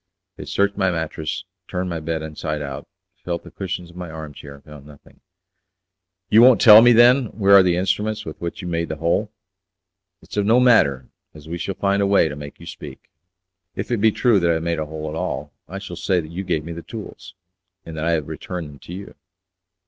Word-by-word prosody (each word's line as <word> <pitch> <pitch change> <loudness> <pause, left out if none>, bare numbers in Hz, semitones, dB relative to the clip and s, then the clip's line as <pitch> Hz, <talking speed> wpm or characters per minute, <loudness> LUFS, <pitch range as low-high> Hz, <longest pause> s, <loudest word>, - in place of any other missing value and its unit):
They - - -9
searched 100 0 0
my 95 -2 +2
mattress, 80 -2 -3 0.2
turned 90 0 -3
my 85 - -3
bed 80 0 -3
inside 75 0 -4
out, 70 -1 -7 0.4
felt 85 -1 -4
the - - -13
cushions 90 -3 -5
of - - -20
my 90 -1 -7
arm 80 -2 -8
chair, 70 0 -11
and 70 - -18
found 75 -2 -13
nothing. 75 -1 -18 1.1
"You 110 - +7
won't 125 0 +7
tell 110 -2 +9
me, 120 +1 +6
then, 120 +3 +6
where 100 -2 +4
are 100 - +9
the 90 -2 +2
instruments 100 +4 -1
with 80 - -9
which 85 +2 -5
you - - -5
made 85 -1 -2
the 80 - -3
hole. 85 +7 -1 0.9
It's - - -10
of 105 0 +1
no 115 +3 +5
matter, 70 - +4 0.3
as 75 0 -13
we 85 +2 -5
shall 95 +3 -4
find 100 0 0
a 100 - +2
way 100 -5 +3
to 75 - -6
make 75 0 -10
you - - -12
speak." - - -11 0.6
"If - - -5
it 120 - +2
be 110 0 +5
true 115 -2 +3
that 85 -1 +1
I 85 - +3
have 80 - -3
made 85 -1 -1
a 80 - -3
hole 80 0 -6
at 75 - -5
all, 80 -4 -4
I 95 - -7
shall 95 -3 -7
say 90 +1 0
that 80 -1 -7
you 90 +3 -5
gave 85 -5 -2
me 85 - -6
the 85 - -7
tools, 95 -4 -10 0.5
and 80 - -8
that 80 0 -3
I 85 - +2
have 75 -3 -1
returned 80 +1 -6
them 70 -1 -14
to 85 - -11
you." 100 +2 -9
85 Hz, 230 wpm, -21 LUFS, 80-100 Hz, 1.1 s, tell